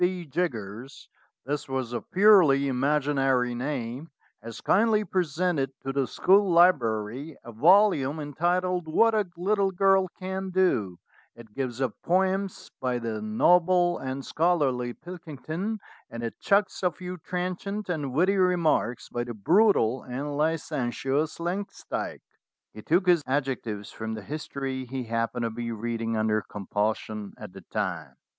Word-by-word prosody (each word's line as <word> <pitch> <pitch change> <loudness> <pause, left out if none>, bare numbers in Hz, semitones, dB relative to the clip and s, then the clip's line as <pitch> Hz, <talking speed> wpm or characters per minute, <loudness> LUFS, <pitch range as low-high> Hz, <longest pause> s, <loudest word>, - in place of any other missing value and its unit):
B. 180 -1 0
Jiggers" 130 - -4 0.4
this 145 +1 -3
was 130 -3 -3
a 120 - -2
purely 180 -9 +5
imaginary 135 -2 +1
name 130 +2 -4 0.3
"has 115 0 -8
kindly 215 +1 +3
presented 160 -7 -1
to 135 - -4
the 135 -2 0
school 195 0 +3
library 135 -5 +2
a 120 - -9
volume 155 - +4
entitled 175 +4 -1
'What 225 +8 +4
a 210 -3 +1
Little 195 +2 +1
Girl 195 0 +3
can 190 0 -4
do'; 125 - +1 0.4
it 110 -3 -14
gives 130 -2 -3
up 130 -5 0
poems 190 +2 0
by 125 -1 0
the 115 -2 -4
noble 175 +10 +3
and 135 +1 -5
scholarly 145 -7 +1
Pilkington, 175 - -6 0.3
and 115 0 -7
it 115 - -5
chucks 200 +1 +1
a 180 - +3
few 180 +2 -7
trenchant 185 +5 -4
and 150 -7 -2
witty 185 +9 +2
remarks 175 -9 +1
by 120 - -3
the 120 -1 -6
brutal 135 - +3
and 140 +4 -5
licentious 145 -1 -1
Langs 180 +4 -4
dyke." - - -3 0.5
He 110 - -9
took 175 - +2
his 175 -3 +4
adjectives 130 -7 -2
from 110 0 -5
the 110 - -8
history 135 -1 -4
he 130 +1 -4
happened 115 +1 -2
to 115 - -1
be 115 +1 -4
reading 115 0 -2
(under 110 0 +1
compulsion) 105 +1 -3
at - - -10
the 95 - -10
time. 95 -7 -3
145 Hz, 140 wpm, -27 LUFS, 120-180 Hz, 0.5 s, purely